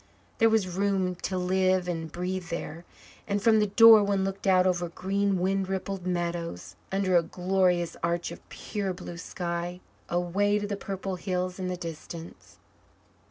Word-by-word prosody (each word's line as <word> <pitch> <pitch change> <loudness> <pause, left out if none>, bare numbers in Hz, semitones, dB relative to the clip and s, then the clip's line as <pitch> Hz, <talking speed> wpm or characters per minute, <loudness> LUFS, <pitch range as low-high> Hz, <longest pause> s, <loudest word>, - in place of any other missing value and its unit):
There 225 - +6
was 220 -4 +2
room 190 0 0
to 185 +1 -3
live 185 0 +2
and 165 -2 -3
breathe 180 0 -3
there, 170 0 -5 0.4
and 200 0 0
from 220 +1 +4
the 210 - +2
door 225 +1 +8
one 200 -1 +1
looked 195 +1 -3
out 185 -1 +5
over 175 -2 +1
green 195 +2 0
wind 190 +1 0
rippled 190 -1 -3
meadows, 170 - -3 0.2
under 190 -1 +1
a 170 - +6
glorious 180 0 0
arch 170 +1 -1
of - - -12
pure 200 -3 -4
blue 175 -1 -8
sky, 175 0 -4 0.3
away 185 +4 +1
to 205 - -2
the 205 0 -2
purple 195 -1 -4
hills 180 0 -2
in 185 - -2
the 180 0 -3
distance. 165 0 -9
185 Hz, 160 wpm, -28 LUFS, 175-195 Hz, 0.4 s, door